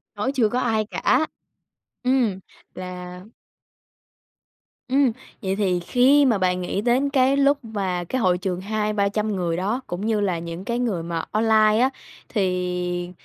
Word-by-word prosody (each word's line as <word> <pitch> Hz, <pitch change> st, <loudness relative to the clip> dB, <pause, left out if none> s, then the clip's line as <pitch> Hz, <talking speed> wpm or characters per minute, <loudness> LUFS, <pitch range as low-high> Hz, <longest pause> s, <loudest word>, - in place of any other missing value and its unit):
Khấu 250 Hz, +6 st, -1 dB
chưa 240 Hz, -6 st, +2 dB
có 250 Hz, -, -1 dB
ai 220 Hz, -2 st, +1 dB
cả. 310 Hz, +7 st, +1 dB, 0.8 s
Ừm, 245 Hz, -7 st, +1 dB, 0.4 s
là 180 Hz, 0 st, -7 dB, 1.7 s
Ừm, 270 Hz, -1 st, +3 dB, 0.3 s
vậy 190 Hz, -1 st, -1 dB
thì 190 Hz, -3 st, +1 dB
khi 255 Hz, +10 st, +4 dB
mà 230 Hz, -6 st, +3 dB
bạn 180 Hz, -1 st, 0 dB
nghĩ 185 Hz, +3 st, -2 dB
đến 250 Hz, +4 st, +2 dB
cái 270 Hz, 0 st, +3 dB
lúc 280 Hz, +1 st, +4 dB
mà 190 Hz, -5 st, -2 dB
cái 255 Hz, +8 st, -2 dB
hội 180 Hz, -2 st, +3 dB
trường 180 Hz, 0 st, -3 dB
200-300 210 Hz, 0 st, -1 dB
người 170 Hz, -2 st, -1 dB
đó 210 Hz, +8 st, -1 dB
cũng 180 Hz, +4 st, -4 dB
như 220 Hz, -1 st, +1 dB
là 185 Hz, -4 st, 0 dB
những 170 Hz, +2 st, -7 dB
cái 235 Hz, +1 st, -1 dB
người 200 Hz, -9 st, -1 dB
mà 165 Hz, -1 st, -3 dB
online 215 Hz, 0 st, +4 dB
á, 260 Hz, -, +4 dB, 0.4 s
thì 180 Hz, -3 st, -1 dB
205 Hz, 155 wpm, -23 LUFS, 180-240 Hz, 1.7 s, khi